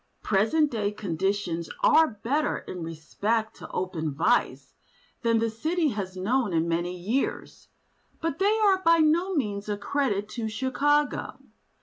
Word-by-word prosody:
Present 225 +10 +2
day 210 -3 -1
conditions 190 -3 -2
are 320 0 +6 0.2
better 285 +5 +1
in 180 - -8
respect 200 +8 -2
to - - -10
open 165 -4 -3
vice 225 - 0 0.5
than 230 -1 +2
the 225 0 +1
city 310 +9 0
has 195 -5 -5
known 220 +2 0
in 165 0 +1
many 175 +2 -1
years. 220 +10 -3 0.5
But 330 -2 -3
they 410 +3 +3
are 390 -3 +4
by 335 -2 +5
no 335 +4 +2
means 210 -7 -2
a 205 - -1
credit 205 -2 -1
to 225 -1 -4
Chicago. 275 +6 0
220 Hz, 140 wpm, -26 LUFS, 190-290 Hz, 0.5 s, are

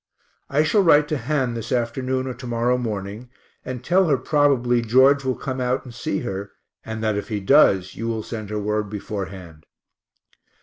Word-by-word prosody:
I 145 +2 +2
shall 180 +7 +3
write 150 -5 +5
to 155 - 0
Han 135 -5 -1
this 115 +1 -6
afternoon 130 +1 -1
or 130 - -4
to 125 +1 -9
morrow 120 +1 +1
morning 110 -1 -5 0.3
and 125 -1 -6
tell 180 +5 +3
her 140 -4 +3
probably 130 -3 +2
George 130 +5 +4
will 130 -1 0
come 130 -1 -4
out 125 +2 -1
and 125 - -10
see 155 +7 -3
her, 100 -3 -5 0.3
and 110 0 -5
that 110 -2 +1
if 100 - -4
he 105 -3 -2
does 95 -5 +4
you 115 - -4
will 110 -2 -2
send 110 -3 -6
her 105 - -3
word 105 0 -1
beforehand. 95 -6 -7
120 Hz, 185 wpm, -22 LUFS, 105-130 Hz, 0.3 s, write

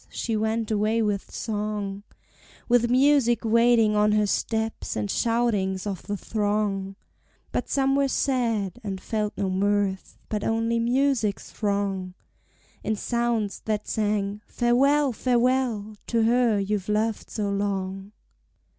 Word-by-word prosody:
she 230 - -3
went 220 +1 -1
away 215 +2 +1
with 205 -3 -1
song, 210 -2 -3 0.7
With 240 -1 +3
music 255 -3 +3
waiting 230 -1 +4
on 210 0 +3
her 210 0 +3
steps, 220 +2 -2
and 105 -2 -2
shoutings 210 -5 0
of 195 -4 -4
the 205 0 -4
throng; 205 -2 -1 0.6
But - - -2
some 270 0 +2
were 280 0 +3
sad, 230 -9 0
and 195 -2 -4
felt 210 +1 -2
no 195 - 0
mirth, 195 0 0
but 210 -1 -3
only 225 +1 0
Music's 240 -4 0
wrong, 200 -3 -1 0.7
In 220 - 0
sounds 235 -2 -1
that 215 -1 -2
sang 205 -1 -1
Farewell, 275 +3 +2
Farewell 240 -3 +1
to 230 -1 +2
her 235 -1 +3
you've 200 0 -2
loved 215 +1 0
so 205 -2 -2
long. 195 -1 -2
215 Hz, 130 wpm, -25 LUFS, 200-235 Hz, 0.7 s, waiting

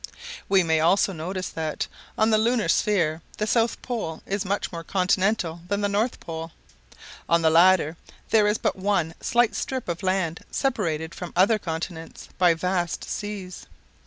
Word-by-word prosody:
We 195 -1 +5
may 160 -1 +2
also 190 +4 +3
notice 185 +3 -4
that, 160 -2 -3 0.3
on 220 +1 +3
the 215 - +4
lunar 230 0 +2
sphere, 170 -7 +2 0.2
the 210 - 0
south 230 +1 +1
pole 220 -11 -4
is 200 0 -2
much 200 +1 -2
more 165 -2 -6
continental 185 -1 0
than 200 +2 -1
the 205 - +2
north 210 +5 0
pole. 165 0 -7 0.8
On 170 0 +3
the 160 - +4
latter, 170 -1 +5 0.3
there 215 -2 +5
is 210 +1 +2
but - - 0
one 190 -4 0
slight 240 -2 +2
strip 260 -2 -3
of 170 +1 -3
land 185 -3 0
separated 170 - -1
from 180 -2 -7
other 200 +5 +4
continents 165 -1 -6
by 175 -2 +5
vast 175 0 -1
seas. 200 -3 -6
185 Hz, 160 wpm, -25 LUFS, 165-210 Hz, 0.8 s, We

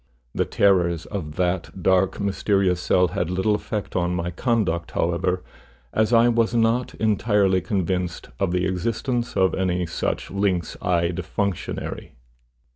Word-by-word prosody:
The - - 0
terrors 90 -4 +2
of 80 -7 -5
that 90 0 -2
dark, 95 +1 +2
mysterious 100 -2 +1
cell 90 0 +3
had 90 -2 -2
little 95 +4 +1
effect 105 0 -4
on 90 0 0
my 90 0 -2
conduct, 90 -5 0
however, 90 +2 0 0.5
as 110 +1 +2
I 115 0 +6
was 115 0 +2
not 115 +2 +1
entirely 105 -3 +2
convinced 90 -4 -2
of 95 -3 +1
the 90 0 +1
existence 115 +6 -2
of 95 -1 +3
any 90 -1 0
such 80 - -3
lynx 95 -3 0
eyed 85 0 0
functionary. 100 +1 -3
95 Hz, 135 wpm, -23 LUFS, 90-105 Hz, 0.5 s, I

